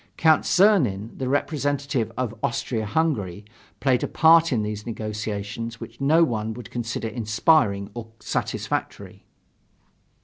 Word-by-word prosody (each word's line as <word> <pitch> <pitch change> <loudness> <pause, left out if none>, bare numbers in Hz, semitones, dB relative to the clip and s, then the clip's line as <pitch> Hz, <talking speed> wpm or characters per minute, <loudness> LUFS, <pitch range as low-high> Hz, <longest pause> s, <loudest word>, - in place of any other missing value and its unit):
Count 160 -2 +4
Czernin, 135 - +3
the 130 -1 -3
representative 140 -4 -1
of 125 -3 -2
Austria 115 -2 -2
Hungary, 105 - -1 0.3
played 130 -2 +2
a - - 0
part 165 0 +5
in 115 -5 +1
those 105 0 -4
negotiations 110 0 -5
which 115 +4 -10
no 155 +5 +5
one 110 -6 -1
would 120 -3 -10
consider 115 -1 -3
inspiring 110 -1 +1
or 120 -2 -7
satisfactory. - - -4
115 Hz, 125 wpm, -24 LUFS, 110-145 Hz, 0.3 s, part